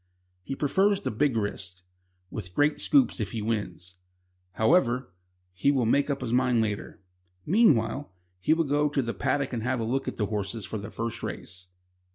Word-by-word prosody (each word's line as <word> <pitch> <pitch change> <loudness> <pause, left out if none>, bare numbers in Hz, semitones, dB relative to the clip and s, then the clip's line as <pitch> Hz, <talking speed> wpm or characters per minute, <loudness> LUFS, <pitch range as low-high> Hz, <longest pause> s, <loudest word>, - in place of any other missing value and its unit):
He 135 - -5
prefers 195 +8 +2
the - - -2
big 120 +3 +1
risks, 95 -3 -4 0.5
with 90 +1 -6
great 145 +1 +2
scoops 275 - +3
if 110 - -3
he 110 -2 -3
wins. 95 -5 -4 0.6
However, 125 - +2 0.4
he 95 +9 +1
will 130 -4 +1
make 140 +6 +2
up 140 -1 -1
his 120 -2 -2
mind 125 -1 +3
later. 105 -3 -3 0.4
Meanwhile, 145 - +3 0.3
he 155 - +3
will 165 - +2
go 145 0 +1
to 140 -2 0
the 115 0 -3
paddock 140 -2 -1
and 115 - -2
have 125 +2 -1
a - - -1
look 130 +4 -1
at - - -4
the 105 - +1
horses 105 +1 -3
for 110 - -4
the 100 +1 -7
first 115 +1 -4
race. 90 +1 -7
120 Hz, 185 wpm, -27 LUFS, 105-140 Hz, 0.6 s, scoops